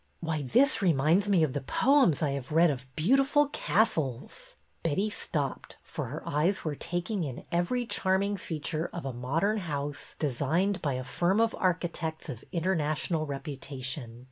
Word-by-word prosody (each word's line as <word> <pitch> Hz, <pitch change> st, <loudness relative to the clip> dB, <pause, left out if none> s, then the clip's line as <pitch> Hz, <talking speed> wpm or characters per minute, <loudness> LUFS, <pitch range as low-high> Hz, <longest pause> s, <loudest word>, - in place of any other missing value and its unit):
Why, 160 Hz, -2 st, -2 dB
this 245 Hz, -, +3 dB
reminds 170 Hz, +3 st, +3 dB
me 185 Hz, -5 st, +4 dB
of 145 Hz, -5 st, 0 dB
the 145 Hz, -, -2 dB
poems 245 Hz, -, +3 dB
I 145 Hz, -, +1 dB
have 140 Hz, -1 st, -5 dB
read 165 Hz, +1 st, +5 dB
of 130 Hz, -2 st, -6 dB
beautiful 275 Hz, -, +3 dB
castles." 160 Hz, -, -1 dB, 0.3 s
Betty 190 Hz, +7 st, 0 dB
stopped, 145 Hz, -9 st, -3 dB
for -, -, -5 dB
her -, -, -7 dB
eyes 170 Hz, +7 st, +1 dB
were 155 Hz, -, 0 dB
taking 175 Hz, +6 st, -2 dB
in 135 Hz, -5 st, -6 dB
every 175 Hz, +9 st, +1 dB
charming 200 Hz, -1 st, +1 dB
feature 160 Hz, -2 st, -3 dB
of 170 Hz, -, -5 dB
a 135 Hz, -, -3 dB
modern 160 Hz, -, 0 dB
house 145 Hz, -5 st, -4 dB
designed 160 Hz, +8 st, 0 dB
by 145 Hz, -4 st, 0 dB
a 130 Hz, 0 st, -3 dB
firm 180 Hz, -, +1 dB
of 230 Hz, -1 st, +3 dB
archi 180 Hz, -1 st, +1 dB
tects 160 Hz, -2 st, -5 dB
of 120 Hz, -5 st, -6 dB
international 160 Hz, -2 st, 0 dB
reputation. 135 Hz, -3 st, -5 dB
160 Hz, 160 wpm, -29 LUFS, 140-190 Hz, 0.3 s, read